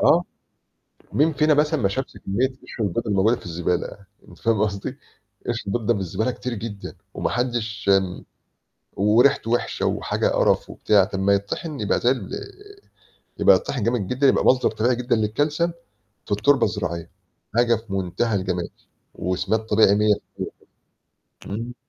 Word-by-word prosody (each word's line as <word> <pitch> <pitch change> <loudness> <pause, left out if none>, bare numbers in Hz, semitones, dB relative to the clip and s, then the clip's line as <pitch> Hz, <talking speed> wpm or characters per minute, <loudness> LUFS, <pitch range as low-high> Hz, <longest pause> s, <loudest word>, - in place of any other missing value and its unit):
آه. - - +5 0.9
مين 155 +4 +3
فينا 155 +1 +3
مثلًا 150 0 +2
ما 100 - +3
شافش 130 +7 -4
كمية 120 +7 +1
قشر 130 -3 -8
البْيض 100 +5 -2
الموجودة 105 +3 +3
في - - -13
الزبالة، 90 +3 -3 0.2
أنت - - -15
فاهم 115 -3 +1
قصدي؟ 100 -2 -3 0.5
قشر 120 -1 -1
البْيض 110 +2 -2
ده - - +4
في 100 - -3
الزبالة 95 +6 -1
كتير 125 0 -4
جدًا، 105 -2 -7 0.2
وما - - -1
حدش 120 -4 -2
آمم، 95 -2 -3 0.7
وريحته 115 +5 +3
وحشة، 120 - 0
وحاجة - - 0
قرف - - +2
وبتاع، 100 -3 +3
طَب 95 -2 -4
ما 100 +1 +4
يتطحن 125 +9 -3
يبقى 105 - +1
زَي 120 - +3
ال 125 -8 -2
آآ، 405 0 -10 0.6
يبقى - - +7
يتطحن 125 -6 -3
جامد 115 -3 0
جدًا 130 +7 +1
يبقى - - +3
مصدر 130 0 +4
طبيعي 115 +3 +1
جدًا 120 -1 0
للكالسيوم 145 +10 0 0.5
في - - -5
التربة 120 +5 +3
الزراعية، 85 -3 -3 0.5
حاجة 120 0 +4
في 110 -2 -10
منتهى 95 +4 -1
الجمال 90 -2 -2 0.5
وسماد 95 +4 -1
طبيعي 105 -2 +5
100% 105 0 -5
كده. 120 +1 -8
110 Hz, 155 wpm, -23 LUFS, 100-125 Hz, 0.9 s, يبقى